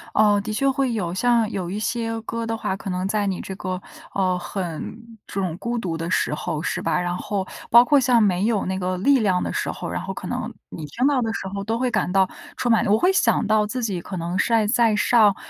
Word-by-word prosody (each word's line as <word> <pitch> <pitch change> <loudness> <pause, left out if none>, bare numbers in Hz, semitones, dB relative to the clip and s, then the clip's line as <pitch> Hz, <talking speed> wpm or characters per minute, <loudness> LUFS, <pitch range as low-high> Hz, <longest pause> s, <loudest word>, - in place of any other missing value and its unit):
呃， 210 -1 +5
的 215 +1 -4
确 275 +6 +1
会 265 -2 0
有， 180 -6 -2
像 230 +2 +2
有 185 -4 -3
一 195 - -3
些 225 +1 -2
歌 230 +1 -4
的 225 - -1
话， 220 - -2
可 195 - -7
能 180 0 -2
在 205 +1 0
你 190 -2 -2
这 190 - -6
个， 185 -1 -3 0.3
呃， 185 -2 +1
很 175 +1 -5 0.3
这 195 - -3
种 175 -3 -2
孤 235 +4 -3
独 175 -7 -2
的 165 +1 -4
时 160 - +1
候， 150 0 -3
是 - - -2
吧， - - +1
然 175 0 -2
后 195 -1 -2 0.2
包 235 +1 +8
括 290 +2 +4
像 245 -3 +4
没 190 0 +2
有 225 -4 +1
那 190 +1 -2
个 185 0 -1
力 275 +7 +4
量 190 -5 +1
的 - - -2
时 - - -2
候， - - -5
然 - - -3
后 - - -5
可 - - -8
能 - - -3 0.2
你 160 - -7
听 235 - -1
到 280 -2 +3
的 225 -1 -1
时 190 - -4
候 200 - -3
都 225 +2 -1
会 250 0 0
感 - - 0
到 190 -1 +4 0.3
充 240 - 0
满 225 - +3
我 205 +2 +4
会 360 +10 +3
想 385 - +2
到 215 0 +2
自 250 +3 -3
己 200 -6 -1
可 185 - -7
能 175 +1 -2
晒 230 -2 +3
在 225 0 +3
上， 210 -2 +4
210 Hz, 270 characters per minute, -23 LUFS, 185-230 Hz, 0.3 s, 包